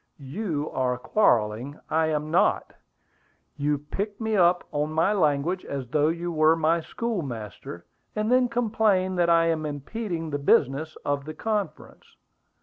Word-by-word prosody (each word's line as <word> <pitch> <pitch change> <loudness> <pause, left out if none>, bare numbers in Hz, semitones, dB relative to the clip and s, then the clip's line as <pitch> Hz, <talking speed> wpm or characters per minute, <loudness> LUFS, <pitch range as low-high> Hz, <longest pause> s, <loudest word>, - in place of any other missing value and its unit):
"You 150 +1 -3
are 125 -1 0
quarrelling; 120 - +1
I 160 0 +1
am 155 0 -2
not. 170 - +2 0.8
You 145 +1 0
pick 195 +9 -5
me 220 -1 -1
up 175 -2 +4
on 150 +1 -1
my 165 +6 +2
language 165 0 +1
as 135 -3 -5
though 150 +3 +2
you 170 +2 -2
were 155 0 +4
my 165 +1 +2
schoolmaster, 125 - -5 0.3
and 215 +2 0
then 250 -1 +4
complain 215 -5 +1
that 175 -1 +3
I 165 0 +5
am 165 -2 0
impeding 165 - -4
the 145 - -2
business 140 +2 +2
of 145 -1 -1
the 155 0 -7
conference." 215 -2 -4
160 Hz, 145 wpm, -26 LUFS, 145-195 Hz, 0.8 s, I